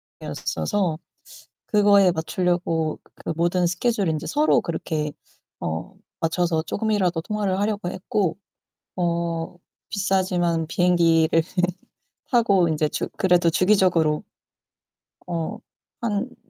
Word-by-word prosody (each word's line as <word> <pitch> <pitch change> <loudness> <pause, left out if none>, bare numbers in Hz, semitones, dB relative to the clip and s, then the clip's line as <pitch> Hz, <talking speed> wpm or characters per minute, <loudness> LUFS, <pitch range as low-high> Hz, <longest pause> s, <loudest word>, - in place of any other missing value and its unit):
상황이었어서 185 -7 -3 0.7
그거에 200 -3 +5
맞추려고 165 -1 -1 0.2
그 - - -5
모든 175 +2 +2
스케줄을 200 +3 0
인제 155 0 -2
서로 300 +1 +3
그렇게 155 -2 -3 0.5
어 80 0 -4 0.3
맞춰서 165 -1 +1
쪼금이라도 190 -3 0
통화를 200 -1 -1
하려고 205 -3 -1
했고 185 -1 -1 0.6
어 170 -1 -1 0.3
비싸지만 180 -5 +1
비행기를 165 -2 +3 0.9
타고 200 -8 +4
인제 155 -1 +1
주 - - -3
그래도 175 -3 +4
주기적으로 180 -4 +3 1.0
어 165 -2 -3 0.4
한 235 +2 -2
175 Hz, 245 characters per minute, -23 LUFS, 165-200 Hz, 1.0 s, 그거에